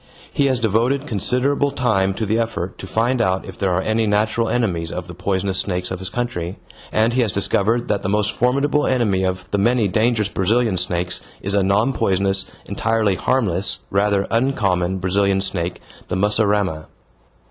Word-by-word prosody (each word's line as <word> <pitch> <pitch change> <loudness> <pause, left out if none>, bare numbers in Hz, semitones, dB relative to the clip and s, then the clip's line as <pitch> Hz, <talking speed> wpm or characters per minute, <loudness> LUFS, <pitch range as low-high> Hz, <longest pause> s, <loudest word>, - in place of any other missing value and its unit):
He 140 - +2
has 130 -2 +1
devoted 120 +6 +1
considerable 135 +4 +1
time 105 -8 +1
to 110 - -2
the 110 +3 +1
effort 110 -6 -3
to 95 - -7
find 120 +4 +1
out 95 -3 0
if - - -9
there 100 - +1
are 90 +1 0
any 110 0 +1
natural 105 +2 +1
enemies 85 -9 -1
of 90 - -5
the 90 - -9
poisonous 95 +2 -1
snakes 90 -2 -2
of 95 - -4
his 95 0 -5
country, 105 -8 -3 0.3
and 110 +2 +2
he 130 - +2
has 110 -4 +1
discovered 105 +4 +1
that 100 - 0
the 95 - -2
most 105 +1 +1
formidable 140 +4 +1
enemy 105 -7 +1
of 95 0 -2
the 100 - +1
many 120 +1 +2
dangerous 110 +2 +1
Brazilian 110 +1 +1
snakes 90 0 -1 0.2
is 100 - -3
a 100 - +3
non 100 +7 +2
poisonous, 95 -2 +1 0.2
entirely 115 -3 0
harmless, 100 -3 0
rather 100 0 +2
uncommon 100 -7 +1
Brazilian 95 +1 +1
snake, 90 -2 -2 0.3
the - - -2
mussurama. 100 -5 +1
100 Hz, 175 wpm, -20 LUFS, 95-115 Hz, 0.3 s, a